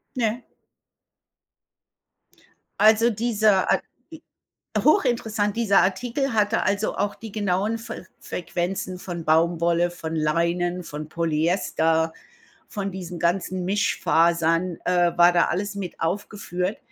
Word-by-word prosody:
Ne. 235 0 -1 2.3
Also 220 +2 +5
dieser 215 -3 +2
Ar - - +2 0.3
i 320 - -11 0.6
hochinteressant, 225 - +1
dieser 200 -4 +4
Artikel 240 +8 -1
hatte 215 +1 +2
also 205 +1 0
auch 205 0 -1
die 225 -2 -10
genauen 205 +2 0
Fer 225 -4 -8
Frequenzen 180 +1 -4
von 170 -3 -6
Baumwolle, 170 +2 +2
von 160 -2 -6
Leinen, 170 +3 0
von 150 0 -7
Polyester, 160 0 0 0.5
von 200 -1 -4
diesen 180 -2 -7
ganzen 180 +1 0
Mischfasern 170 -2 +1
äh, 175 -1 +2
war 175 0 +6
da 175 - +4
alles 205 +3 -2
mit 185 -3 -6
aufgeführt. 190 +1 -3
185 Hz, 110 wpm, -24 LUFS, 170-210 Hz, 2.3 s, war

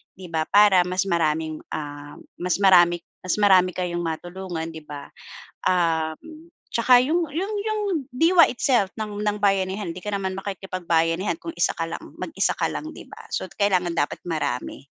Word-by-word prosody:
'di 185 -2 -11
ba? 160 -1 -1
Para 200 -3 +6
mas 185 +1 0
maraming, 160 -2 0 0.2
ah, 145 -1 -7 0.2
mas 180 +1 0
marami 175 -2 +5 0.2
mas 185 - 0
marami 185 -3 +4
kayong 175 -1 -2
matulungan, 175 +1 -5
'di 160 -1 -10
ba? 145 -1 -9 0.5
Um, 175 - -1 0.2
'tsaka 245 +1 +5
yung 330 +4 0
yung 380 +7 -2
yung 435 -1 -1 0.3
diwa 335 +6 +6
itself 240 -6 +1
ng 210 -1 -4
ng 210 0 0
bayanihan, 195 -1 +1
hindi 180 +2 -10
ka 210 - -4
naman 190 -1 -2
makikipagbayanihan 185 - -1
kung 330 - -6
isa - - +2
ka - - -2
lang, - - -6 0.2
mag-isa - - 0
ka - - 0
lang, 315 +1 -5
di - - -11
ba? - - -12
So, - - -2
kailangan 185 -4 0
dapat 145 - -1
marami. 135 -5 -3
185 Hz, 165 wpm, -24 LUFS, 165-210 Hz, 0.5 s, Para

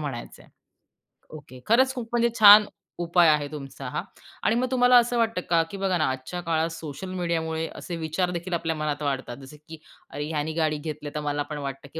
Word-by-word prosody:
म्हणायचंय. 135 -6 -7 0.8
ओके, 145 -4 -12
खरंच 260 +4 +4
खूप 235 -2 -5
म्हणजे 235 0 +2
छान 210 0 +10 0.3
उपाय 170 0 +3
आहे, 150 -1 +2
तुमचा 140 -3 -8
हा - - -3 0.4
आणि 220 - +2
मग 255 +2 +1
तुम्हाला 250 -1 +5
असं 240 0 +2
वाटतं 225 -5 0
का, 170 -1 +4
की 200 - -6
बघा 190 -2 0
ना 155 - +1
आजच्या 130 +7 -5
काळात 165 -1 0
सोशल 165 +3 -7
मीडियामुळे 165 -2 -2
असे 175 - -6
विचारदेखील 175 +2 -3
आपल्या 165 -1 -1
मनात 150 -1 -3
वाढतात. 135 -3 -3
जसे 140 +2 -13
की 160 0 -9 0.3
अरे, 145 - -5
ह्याने 155 0 -2
गाडी 155 -2 0
घेतली, 150 -1 -6
तर - - -1
मला 145 -1 -2
पण 150 - -5
वाटतं, 140 -1 -6
की 160 - -6
160 Hz, 195 wpm, -25 LUFS, 150-185 Hz, 0.8 s, छान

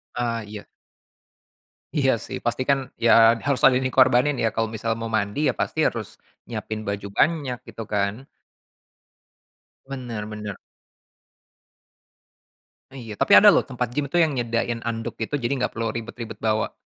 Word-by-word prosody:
Ah, 115 -2 -2
iya. 105 0 -9 1.3
Iya, 135 -2 +3
sih. - - -5
Pastikan 130 +3 +1 0.3
ya 115 0 +6
harus 140 -2 0
ada 135 - +7
yang 130 - -2
dikorbanin 130 +2 +4
ya, 115 - +3
kalau 115 0 +1
misal 115 +1 -2
mau 115 - -4
mandi 100 +6 -2
ya - - 0
pasti - - -3
harus - - -4 0.4
nyiapin 110 -1 -5
baju 100 0 -3
banyak, 145 -6 +1
gitu 115 0 -7
kan. 100 +5 -1 1.6
Bener 120 -5 -5
bener. 105 -2 -6 2.4
Iya, 115 -6 -8
tapi - - -1
ada - - +6
loh - - +3
tempat - - -3
gym 145 -1 0
tuh 175 - +2
yang 150 -4 0
nyediain 115 -1 -1
handuk 115 0 -4
gitu, 145 +6 -2
jadi 120 +1 -2
nggak 125 - -1
perlu 115 0 -3
ribet-ribet 115 -1 -7
bawa. 110 0 0
115 Hz, 145 wpm, -23 LUFS, 110-130 Hz, 2.4 s, ada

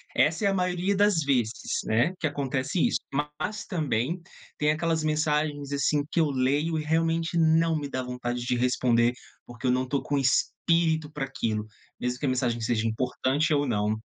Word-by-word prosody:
Essa 165 +7 +2
é - - +5
a 195 - +2
maioria 180 +1 0
das 205 -4 +3
vezes, 125 -5 0
né, 120 +11 +2
que - - -2
acontece 140 +2 -2
isso. - - +1 0.2
Mas, 150 +9 -3
também 155 - -1 0.4
tem 150 0 +2
aquelas 160 0 0
mensagens, 150 -2 0
assim, 140 +1 +2
que - - +1
eu 155 - +2
leio 145 +5 +1
e - - -3
realmente 165 +2 0
não 165 0 +3
me 145 -2 -4
dá 130 - -2
vontade 125 -1 -4
de 125 - +1
responder, 120 -1 +2 0.3
porque 120 +2 -5
eu - - +4
não 130 +1 +1
tô 140 +1 -1
com 145 - -1
espírito 160 +3 +1
pra 150 -3 -3
aquilo, 110 -5 -2 0.3
mesmo 125 0 -2
que - - -2
a - - +2
mensagem 125 -2 0
seja 115 0 0
importante 130 +6 0
ou 145 -1 +1
não 105 -2 0
145 Hz, 185 wpm, -27 LUFS, 125-160 Hz, 0.4 s, é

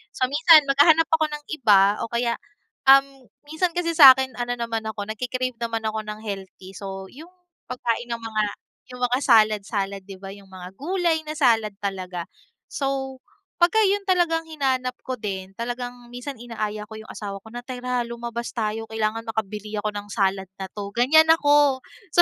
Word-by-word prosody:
So 255 +1 0
minsan 315 +1 +7
maghahanap 300 +4 +4
ako 320 -1 +3
ng 295 -1 -7
iba 205 -8 +4
o - - -3
kaya, 235 0 -1 0.5
um, 270 -1 +5 0.2
minsan 320 +4 -2
kasi 345 -1 0
sa 280 -5 +10
akin 265 0 -2
ano 245 0 -2
naman 230 -2 -3
ako 220 -1 -4
nagke-crave 255 +1 -3
naman 230 -1 -3
ako 215 0 -3
ng 210 0 -6
healthy 190 -2 -7
so 195 -1 -8
yung, 320 +6 -13 0.4
pagkain 240 -1 -2
ng 235 - -3
mga 220 -1 -1 0.5
yung 250 - -11
mga 245 +1 +2
salad-salad 210 -3 +2
'di 195 - -8
ba, 195 - -6
yung 200 0 -13
mga 185 -1 -10
gulay 340 +1 0
na 305 - -4
salad 225 -8 +2
talaga. 185 -3 -4 0.5
So 270 -1 -3 0.4
pagka 355 +6 +4
yung 400 0 0
talagang 345 -3 +1
hinanap 265 -5 -1
ko 255 -1 -5
din, 190 -3 -5
talagang 245 0 -6
minsan 255 +2 -6
inaaya 215 -3 -5
ko 220 - -13
yung 220 0 -11
asawa 200 -2 -7
ko 220 - -14
na, 240 +1 -8
"Tara 250 -1 -3
lumabas 235 0 -6
tayo, 225 -1 -2
kailangan 220 0 -2
makabili 215 -1 -4
ako 215 - -1
ng 205 0 -7
salad 195 -2 0 0.2
na 190 - -5
'to." 200 -1 -7
Ganiyan 285 +7 +5
ako, 290 -4 +3 0.3
so 345 - +7
235 Hz, 175 wpm, -23 LUFS, 215-275 Hz, 0.5 s, sa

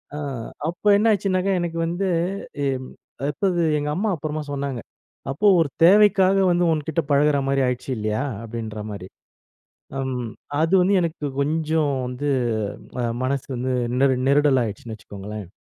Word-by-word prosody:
ஆ - - -4 0.5
அப்ப 175 +5 +1
என்னாச்சுனாக்கா, 195 -3 +2
எனக்கு 170 -1 -3
வந்து 175 +4 -1 0.6
எம் 130 -1 -3 0.4
அப்போது 175 +3 0 0.2
எங்கம்மா 150 +9 -1
அப்பறமா 155 0 -4
சொன்னாங்க. 140 -3 -3 0.5
அப்போ 185 +10 +1
ஒரு 160 -3 +2
தேவைக்காக 195 +1 +6
வந்து 175 0 +2
உன்கிட்ட 160 +1 -1
பழகுறமாரி 140 -1 +3
ஆயிடுச்சு 125 +1 -3
இல்லயா? 110 +4 -1 0.2
அப்பிடின்ற 110 -2 -6
மாரி 95 -2 -7 0.9
அம் 130 -2 -2 0.4
அது 165 +4 +1
வந்து 195 +3 +3
எனக்கு 165 -3 -3
கொஞ்சம் 155 0 +1
வந்து 125 +3 -4 0.7
அ - - -1 0.2
மனசு 135 +1 -1
வந்து 130 +2 -2 0.3
நெரு 135 -1 +4
நெருடலா 140 -2 +4
ஆயிடுச்சுன்னு 110 +1 -6
வச்சுக்கோங்களேன்! 105 -1 -8
145 Hz, 125 wpm, -23 LUFS, 130-175 Hz, 0.9 s, தேவைக்காக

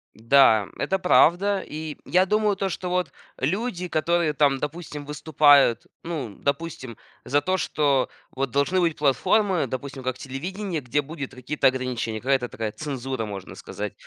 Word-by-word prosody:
Да, 115 -3 +5
это 190 - 0
правда. 185 +2 +4
И 155 -1 -6
я 185 +2 +3
думаю 210 0 +2
то, 195 0 -2
что 180 0 -4
вот 180 -5 -1 0.3
люди, 180 - -2
которые 170 0 +1
там, 140 -2 +3
допустим, 150 -1 -6
выступают, 145 -4 +4 0.2
ну, 140 -11 -5
допустим, 140 -5 -3 0.3
за 145 +2 +2
то, 185 +5 0
что 140 -7 +1 0.2
вот 135 0 -2
должны 140 +8 +1
быть 170 -3 +1
платформы, 170 +4 +2
допустим, 135 +2 -6
как 130 0 -2
телевидение, 170 +6 -5
где 130 +4 0
будет 145 -2 -7
какие-то 130 +3 +1
ограничения, 125 -4 -2
какая-то 130 -1 +1
такая 110 -1 -4
цензура, 135 -3 -4
можно 100 -3 -8
сказать. - - -6
145 Hz, 150 wpm, -24 LUFS, 130-175 Hz, 0.3 s, Да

